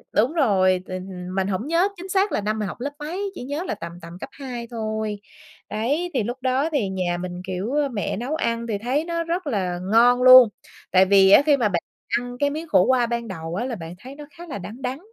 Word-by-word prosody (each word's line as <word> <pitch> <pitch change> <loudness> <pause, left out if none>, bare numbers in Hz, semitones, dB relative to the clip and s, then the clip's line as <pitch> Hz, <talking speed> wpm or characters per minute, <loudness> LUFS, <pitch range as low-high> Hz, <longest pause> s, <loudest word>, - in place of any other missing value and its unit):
đúng 245 +9 +3
rồi, 185 - +2
thì 185 - -5 0.4
mình 190 0 0
hổng 200 +7 -2
nhớ 340 +4 +3
chính 370 +2 -9
xác 390 +2 +2
là - - 0
năm 215 +1 -2
mình 210 - -2
học - - -7
lớp 285 +2 -2
mấy, 370 +7 -4
chỉ - - -7
nhớ 290 +6 -3
là - - -2
tầm, 170 0 -7
tầm 170 0 -10
cấp - - -7
2 245 -4 -7
thôi. 215 -2 -3 0.5
Đấy, 285 +12 -1
thì 245 -5 +1
lúc 245 +4 -4
đó 265 +4 +1
thì 255 -11 0
nhà 180 -2 -1
mình, 180 0 -6
kiểu, 190 +6 -3
ơ, 290 -2 +1
mẹ 205 -4 -3
nấu 260 +7 -3
ăn 230 -5 -1
thì 210 -3 -1
thấy 255 +8 -1
nó 335 -1 -2
rất 335 -1 -3
là 185 -7 -1
ngon 245 +2 +5
luôn, 255 -3 +10 0.4
tại 190 +1 +6
vì 195 0 +5
á, - - +9
khi 290 -2 +4
mà 225 -5 +1
bạn 170 -3 -1 0.4
ăn 245 0 -7
cái 285 0 +2
miếng 315 +3 -5
khổ 185 -11 +4
qua 250 0 +3
ban 235 0 -3
đầu 165 -2 -6
á, 235 +5 -2
là 255 - -3
bạn 170 -2 -8
thấy 265 +4 -11
nó 295 - -10
khá 345 0 -10
là 275 - -5
đắng, 215 +7 -9
đắng, 260 +3 -3
235 Hz, 250 wpm, -23 LUFS, 195-285 Hz, 0.5 s, luôn